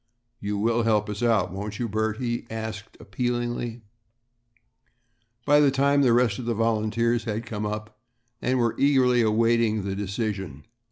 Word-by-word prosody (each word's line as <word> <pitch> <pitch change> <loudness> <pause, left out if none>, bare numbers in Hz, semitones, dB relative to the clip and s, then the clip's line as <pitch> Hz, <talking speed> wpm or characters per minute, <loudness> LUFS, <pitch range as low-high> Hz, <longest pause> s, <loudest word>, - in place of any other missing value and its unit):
"You 100 0 -3
will 115 +3 +1
help 105 -2 +1
us 105 - -6
out, 110 -7 +2
won't 100 +1 -5
you, 120 - -2
Bert?" 110 0 -1
he 120 -1 -3
asked 110 -1 -6
appealingly. 120 -1 -3 1.6
By 145 +1 +5
this 140 -2 +4
time 140 +1 +3
the 130 -3 +4
rest 115 -4 +2
of 125 - -5
the 115 -1 -1
volunteers 115 +1 0
had 110 0 -3
come 105 -2 -4
up 105 0 -6 0.4
and 130 +1 +1
were 120 -2 +1
eagerly 130 -3 +4
awaiting 115 -1 +2
the 95 0 -3
decision. 100 - -4
115 Hz, 155 wpm, -25 LUFS, 105-120 Hz, 1.6 s, By